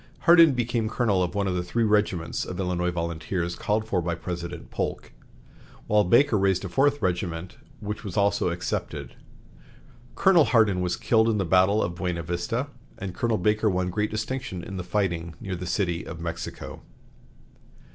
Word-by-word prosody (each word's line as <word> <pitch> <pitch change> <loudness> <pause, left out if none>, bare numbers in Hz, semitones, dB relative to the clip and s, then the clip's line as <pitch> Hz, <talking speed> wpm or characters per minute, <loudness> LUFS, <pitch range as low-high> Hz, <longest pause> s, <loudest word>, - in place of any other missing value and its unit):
Hardin 165 -4 +7
became 120 -2 0
colonel 110 -5 +1
of 90 +2 -1
one 100 -1 +1
of 95 - 0
the 90 - 0
three 115 +7 -1
regiments 105 -6 +1
of 90 - -6
Illinois 90 -1 0
volunteers 85 +1 -3
called 110 +1 -1
for 95 -5 0
by 85 0 -2
President 85 -1 -6
Polk, - - -3 0.7
while 105 0 +3
Baker 120 +4 +4
raised 95 -1 +1
a - - -4
fourth 145 +8 +2
regiment, 90 -1 -2 0.2
which 105 +2 -5
was 100 -3 -6
also 100 0 +2
accepted. - - -4 1.0
Colonel 175 -6 +5
Hardin 110 -7 +3
was 90 -1 0
killed 110 -1 +3
in 110 - +1
the 95 - 0
battle 95 +5 +4
of 85 - -2
Buena 85 -1 -3
Vista, 90 - -2 0.3
and 95 -2 -5
Colonel 115 +2 0
Baker 105 +3 +2
won 90 -1 -1
great 105 +3 0
distinction 110 -4 -4
in 95 - -6
the 90 - -3
fighting 85 -4 -2
near 95 -2 -4
the 90 +1 -6
City 85 -3 -1
of 85 - -8
Mexico. 85 0 -6
95 Hz, 170 wpm, -26 LUFS, 90-110 Hz, 1.0 s, Hardin